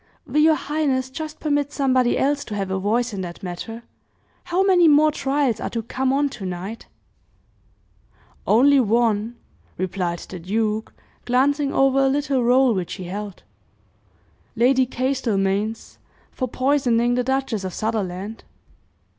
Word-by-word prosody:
"Will 295 Hz, +2 st, +1 dB
your 315 Hz, 0 st, +5 dB
highness 275 Hz, -4 st, -1 dB
just 310 Hz, +2 st, -6 dB
permit 290 Hz, -2 st, 0 dB
somebody 260 Hz, -4 st, +2 dB
else 285 Hz, +1 st, +1 dB
to 210 Hz, -, -6 dB
have 195 Hz, -2 st, -3 dB
a 190 Hz, -, -1 dB
voice 230 Hz, +4 st, 0 dB
in 195 Hz, -, -4 dB
that 175 Hz, 0 st, -8 dB
matter? 225 Hz, +6 st, -6 dB, 0.6 s
How 360 Hz, +2 st, +1 dB
many 365 Hz, -3 st, +5 dB
more 305 Hz, 0 st, +5 dB
trials 275 Hz, -4 st, 0 dB
are -, -, -3 dB
to 230 Hz, -1 st, -4 dB
come 260 Hz, +3 st, -1 dB
on 285 Hz, +2 st, +2 dB
tonight?" 190 Hz, -2 st, -6 dB, 1.6 s
"Only 275 Hz, +5 st, +5 dB
one," 230 Hz, -1 st, +1 dB, 0.4 s
replied 180 Hz, -1 st, -2 dB
the 180 Hz, +1 st, -9 dB
duke, 215 Hz, +4 st, -2 dB, 0.3 s
glancing 275 Hz, +3 st, +2 dB
over 270 Hz, -1 st, +3 dB
a 270 Hz, -, +4 dB
little 275 Hz, -2 st, 0 dB
roll 250 Hz, +1 st, +4 dB
which 185 Hz, -4 st, -3 dB
he 185 Hz, -, -8 dB
held; 200 Hz, +2 st, -7 dB, 1.1 s
"Lady 255 Hz, +2 st, +3 dB
Castlemaine's, 225 Hz, -5 st, -1 dB, 0.3 s
for 255 Hz, -, -3 dB
poisoning 245 Hz, -2 st, +1 dB
the 250 Hz, 0 st, +1 dB
Duchess 265 Hz, -5 st, -1 dB
of 185 Hz, -, -4 dB
Sutherland." 210 Hz, 0 st, -3 dB
245 Hz, 140 wpm, -22 LUFS, 210-275 Hz, 1.6 s, your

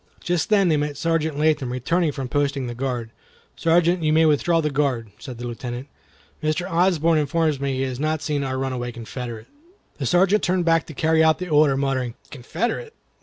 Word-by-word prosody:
Just 175 Hz, +2 st, -1 dB
then 200 Hz, -3 st, +4 dB
they 155 Hz, -3 st, +3 dB
met 145 Hz, -1 st, -2 dB
Sergeant 160 Hz, -1 st, 0 dB
Latham 150 Hz, -4 st, +1 dB
returning 155 Hz, +7 st, 0 dB
from 135 Hz, -2 st, -5 dB
posting 140 Hz, -1 st, -1 dB
the 120 Hz, -, -4 dB
guard. 120 Hz, -2 st, -3 dB, 0.4 s
"Sergeant, 170 Hz, +1 st, +2 dB
you 155 Hz, -1 st, +1 dB
may 160 Hz, +1 st, +4 dB
withdraw 160 Hz, +3 st, +3 dB
the 150 Hz, -2 st, 0 dB
guard," 135 Hz, -6 st, -1 dB
said 125 Hz, -1 st, -8 dB
the 120 Hz, -, -6 dB
Lieutenant; 120 Hz, +2 st, -6 dB, 0.5 s
"Mr. 155 Hz, +4 st, -1 dB
Osborne 170 Hz, -3 st, +2 dB
informs 155 Hz, 0 st, 0 dB
me 140 Hz, -1 st, -1 dB
he 130 Hz, -, -2 dB
has 130 Hz, -1 st, -3 dB
not 155 Hz, +1 st, -1 dB
seen 150 Hz, -3 st, -1 dB
our 130 Hz, -1 st, -2 dB
runaway 130 Hz, -2 st, -3 dB
Confederate." 120 Hz, -1 st, -7 dB, 0.5 s
The 135 Hz, -, -1 dB
Sergeant 190 Hz, -, +3 dB
turned 180 Hz, -1 st, 0 dB
back 165 Hz, -1 st, +2 dB
to 155 Hz, -, -10 dB
carry 160 Hz, +1 st, +3 dB
out 160 Hz, 0 st, +4 dB
the 180 Hz, -1 st, -6 dB
order, 150 Hz, -3 st, +4 dB
muttering, 130 Hz, -3 st, -1 dB, 0.2 s
"Confederate! 235 Hz, -, -3 dB
150 Hz, 190 wpm, -23 LUFS, 130-165 Hz, 0.5 s, then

